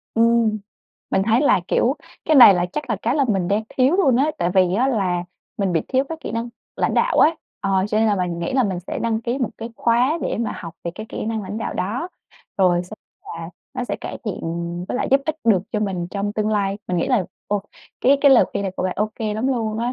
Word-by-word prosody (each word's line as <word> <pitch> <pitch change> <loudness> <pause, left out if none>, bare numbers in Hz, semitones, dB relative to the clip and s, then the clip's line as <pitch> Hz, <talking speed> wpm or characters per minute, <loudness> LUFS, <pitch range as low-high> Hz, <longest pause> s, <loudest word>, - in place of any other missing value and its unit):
Ừm, 230 -1 +3 0.5
mình 190 - +2
thấy 230 +2 +4
là, 285 - +4
kiểu, 265 +5 +2 0.3
cái 315 - +2
này 240 -7 +10
là 175 0 0
chắc 300 -2 -4
là - - +1
cái 235 +3 +1
là 285 -2 +3
mình 190 -5 +1
đang 205 +2 +1
thiếu 265 +6 +2
luôn 275 -11 +4
á, 285 +5 +2
tại 175 - +1
vì 185 -1 +4
á 250 +6 +2
là 185 -8 0 0.3
mình 195 -3 0
bị 165 - +2
thiếu 265 0 +2
cái 325 - -5
kỹ - - -6
năng 230 +1 -2 0.3
lãnh - - 0
đạo - - +2
ấy. - - +7 0.3
Ờ, 195 -2 +1
cho 215 - +1
nên 225 - +3
là 210 -2 +2
mình 180 -2 -2
nghĩ 170 - -3
là 260 0 +3
mình 190 -6 -2
sẽ 180 - -5
đăng 225 -1 0
ký 240 +3 -2
một 250 -5 -1
cái 230 +1 -6
khóa 245 +7 +2
để - - -2
mà 230 -1 -1
học 165 -2 -8
về 170 - -2
cái 215 +2 -7
kỹ - - -5
năng 220 -1 -2
lãnh 205 +2 -5
đạo 220 - -4
đó, 235 - -2 0.5
rồi 180 -2 +3
xe 180 - -10 0.3
là 165 +1 -7 0.2
nó 250 - -2
sẽ - - -3
cải - - -6
thiện 210 -5 -3 0.5
với - - -2
lại - - -1
giúp 275 +1 +5
ích 310 0 -1
được 205 -6 +4
cho 215 - 0
mình 190 -4 -2
trong 205 0 -2
tương 215 0 -1
lai. 200 -2 0
Mình 180 - -1
nghĩ 170 - 0
là 245 -8 +2 0.2
ô 205 -1 -1 0.4
cái 275 +2 +4
cái 280 - +6
lời 260 - +7
khuyên - - -2
này 190 -2 -3
của - - -2
bạn 185 0 0
ô 210 +2 0
kê 215 -2 -3
lắm 220 +4 -1
luôn 225 -4 -1
á, 240 +2 -1
215 Hz, 260 wpm, -21 LUFS, 190-245 Hz, 0.5 s, này